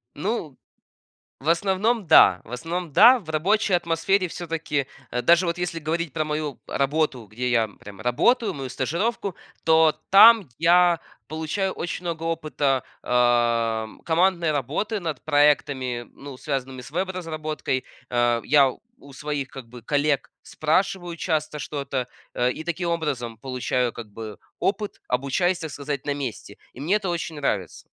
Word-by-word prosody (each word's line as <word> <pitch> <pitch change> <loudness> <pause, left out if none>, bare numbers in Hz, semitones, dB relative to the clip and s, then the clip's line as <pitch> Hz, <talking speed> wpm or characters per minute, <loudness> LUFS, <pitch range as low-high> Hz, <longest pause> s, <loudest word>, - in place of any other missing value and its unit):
Ну, 165 - -3 0.8
в 150 - -2
основном, 195 +5 +1
да - - +7
в 115 - -15
основном, 165 +7 -4
да, 245 - +8
в 175 -8 -14
рабочей 195 +6 +1
атмосфере 175 +3 +1
всё-таки, 165 -4 -3 0.3
э, 125 - -1
даже 170 +2 +5
вот 170 +1 -1
если 175 -2 -3
говорить 160 -1 -2
про 155 - 0
мою 150 -3 -3
работу, 140 -3 0
где 120 +4 -3
я 115 -2 +2
прям 100 -1 -12
работаю, 200 - +2
мою 135 -4 -6
стажировку. 175 - -2 0.3
То 160 -1 +5 0.2
там 220 +1 +8
я 175 +1 +5 0.3
получаю 160 +5 -2
очень 175 +1 -5
много 165 -1 -3
опыта, 150 -5 0 0.2
ам, 120 -2 +1
командной 170 0 +2
работы 150 - -2
над 160 -7 -5
проектами, 145 -5 +2
ну, 140 -2 -10
связанными 135 -3 -4
с 125 - -12
веб-разработкой. 160 -6 -3 0.2
А, 120 -1 +2
я 140 -2 +4 0.3
у 140 - -15
своих 145 0 -3
как 130 -2 -10
бы 120 +1 -12
коллег 145 +2 0
спрашиваю 175 +2 -1
часто 155 -3 -1
что-то, 140 -3 -3 0.3
а, 125 0 +2
и 140 - -5
таким 175 +1 -2
образом 140 -9 -2
получаю 125 -1 -1
как 110 -3 -9
бы 110 0 -8 0.2
опыт, 205 +1 -2
обучаясь, 140 +8 0
так 160 -3 -6
сказать, 140 -1 -5
на 145 - 0
месте. 130 -7 -6 0.2
И 125 - -10
мне 180 +8 +2
это 195 -4 -4
очень 165 -2 -3
нравится. 105 - -2
150 Hz, 150 wpm, -24 LUFS, 130-175 Hz, 0.8 s, да